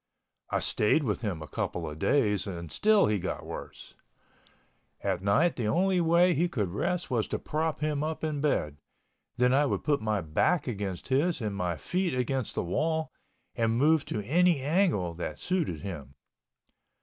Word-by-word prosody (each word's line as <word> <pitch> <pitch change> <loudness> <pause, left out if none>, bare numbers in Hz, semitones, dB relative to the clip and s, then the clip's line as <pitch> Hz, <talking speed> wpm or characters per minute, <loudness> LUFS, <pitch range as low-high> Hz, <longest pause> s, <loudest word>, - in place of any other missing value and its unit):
I - - 0
stayed 110 +9 +2
with 105 -6 -1
him 95 -8 -3
a - - -9
couple 80 +2 -3
of 75 0 -7
days 105 - +2
and 85 -4 -6
still 215 - +4
he 105 -1 +1
got - - -4
worse. - - -9 1.1
At 85 - -1
night 105 - +2
the 115 -4 -1
only 185 - +2
way 170 +2 +4
he 170 +4 +1
could 105 - -1
rest 175 - -2
was 115 -4 +1
to - - -2
prop 155 +1 -2
him 150 -1 0
up 160 +1 -3
in 150 -2 -1
bed, 75 - 0 0.6
then 125 +1 +3
I 145 +2 +4
would - - -2
put 145 -4 +1
my 110 -2 0
back 85 - +1
against 100 -6 -4
his 150 +5 +2
and 105 -4 -3
my 90 -3 -1
feet 180 - -1
against 125 -1 -1
the - - -1
wall, 160 - -1 0.4
and 115 -1 0
move 150 +3 +4
to 105 - -3
any 175 - +3
angle 145 - +1
that 80 -3 -5
suited 165 - -1
him. 70 -8 -7
130 Hz, 175 wpm, -29 LUFS, 100-160 Hz, 1.1 s, still